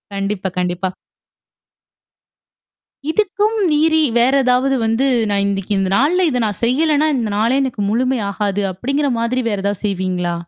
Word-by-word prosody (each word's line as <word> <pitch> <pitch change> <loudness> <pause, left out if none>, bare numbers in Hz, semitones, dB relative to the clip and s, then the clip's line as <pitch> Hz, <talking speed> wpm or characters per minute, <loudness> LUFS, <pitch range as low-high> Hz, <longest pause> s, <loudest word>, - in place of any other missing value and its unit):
கண்டிப்பா, 195 -1 -2
கண்டிப்பா. 180 +1 -1 2.2
இதுக்கும் 420 +3 0
மீறி 315 +1 +3 0.2
வேற 255 +3 +3
ஏதாவது 255 +2 +2
வந்து, 225 +5 +1 0.2
"நான் 200 0 +1
இன்னைக்கு 200 0 -2
இந்த 190 -1 0
நாள்ல 345 +6 +2
இத 250 -2 0
நான் 205 -3 -4
செய்யலன்னா, 305 +4 +2
இந்த 230 -3 -1
நாளே 235 +5 +2
எனக்கு 245 -6 -3
முழுமை 255 +3 0
ஆகாது" 205 0 -2
அப்படிங்கிற 275 +8 -1
மாதிரி 250 +2 0
வேற 205 - -2
ஏதாவது 200 0 -2
செய்வீங்களா? 180 -3 -2
235 Hz, 140 wpm, -18 LUFS, 200-275 Hz, 2.2 s, மீறி